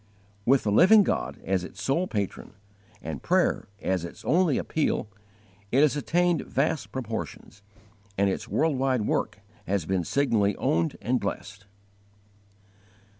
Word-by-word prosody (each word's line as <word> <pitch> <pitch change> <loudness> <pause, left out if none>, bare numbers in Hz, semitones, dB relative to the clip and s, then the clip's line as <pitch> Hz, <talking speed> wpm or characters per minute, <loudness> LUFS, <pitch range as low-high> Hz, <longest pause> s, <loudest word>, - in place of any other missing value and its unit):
With 135 +1 +4
the 105 - 0
Living 200 - +7
God 70 - -2
as 95 -2 0
its 95 - -10
sole 135 +11 0
patron, 100 - -4 0.5
and 75 -4 -5
prayer - - +1 0.2
as 95 -2 0
its 85 - -9
only 165 -1 +3
appeal, 155 -8 -1 0.6
it 135 - +4
has 150 -1 +4
attained 175 +2 +1
vast 150 +2 -1
proportions, 110 -5 -6 0.6
and 100 +1 +3
its 95 - -2
world 155 -4 +1
wide 130 -3 +1
work 105 -1 -1 0.3
has 95 -4 0
been 95 0 0
signally 105 - +1
owned 85 0 0
and 125 +2 +1
blessed. 100 -3 -6
110 Hz, 135 wpm, -26 LUFS, 95-145 Hz, 0.6 s, Living